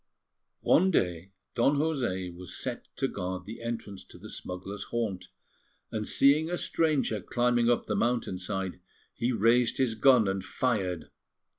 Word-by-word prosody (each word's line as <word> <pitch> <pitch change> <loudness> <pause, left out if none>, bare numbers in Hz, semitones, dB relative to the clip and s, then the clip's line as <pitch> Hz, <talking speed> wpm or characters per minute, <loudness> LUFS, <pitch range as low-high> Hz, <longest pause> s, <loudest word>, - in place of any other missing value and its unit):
One 185 +3 +5
day 90 - 0 0.2
Don 130 +4 +3
José 120 - -1
was 90 0 -7
set - - -4
to - - 0
guard 90 0 -4
the 110 +3 -8
entrance 115 -4 -5
to - - -14
the - - -10
smugglers' 95 +3 -6
haunt, 110 -6 -3 0.6
and 110 -2 -3
seeing 150 +4 +4
a 175 - -1
stranger 150 - +1
climbing 120 +2 +2
up 120 - +2
the 105 - -1
mountain 115 -4 0
side, 95 0 -3 0.3
he 120 +2 -1
raised 115 +2 +3
his 130 -4 +2
gun 120 -1 +5
and 95 0 -1
fired. 95 -6 -1
115 Hz, 150 wpm, -29 LUFS, 95-125 Hz, 0.6 s, One